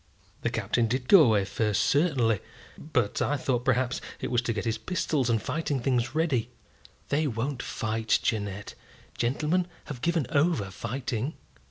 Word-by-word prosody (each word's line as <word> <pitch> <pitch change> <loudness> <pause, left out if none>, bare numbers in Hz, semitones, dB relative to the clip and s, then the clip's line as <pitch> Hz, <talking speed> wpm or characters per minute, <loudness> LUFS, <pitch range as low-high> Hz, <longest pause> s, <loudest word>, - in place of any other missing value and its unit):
"The - - 0
Captain 120 -1 0
did 125 +2 -2
go 195 +2 +9
away 110 -8 +4
first, 105 +1 0
certainly; 135 - +2 0.4
but 120 -9 -1
I 145 - +1
thought 125 -2 0
perhaps 130 0 +1 0.2
it - - -4
was 120 -1 +3
to 120 - -1
get 105 -3 -3
his 115 -1 -1
pistols 155 -8 0
and 115 -1 +3
fighting 150 +1 -2
things 125 +1 0
ready." 155 -8 +1 0.6
"They 150 +2 +2
won't 125 +2 -2
fight, 110 0 0
Jeannette. 105 -2 -2 0.4
Gentlemen 150 +9 0 0.2
have 130 -5 -7
given 170 -2 +1
over 140 - +2
fighting." 120 - -3
125 Hz, 155 wpm, -28 LUFS, 115-145 Hz, 0.6 s, go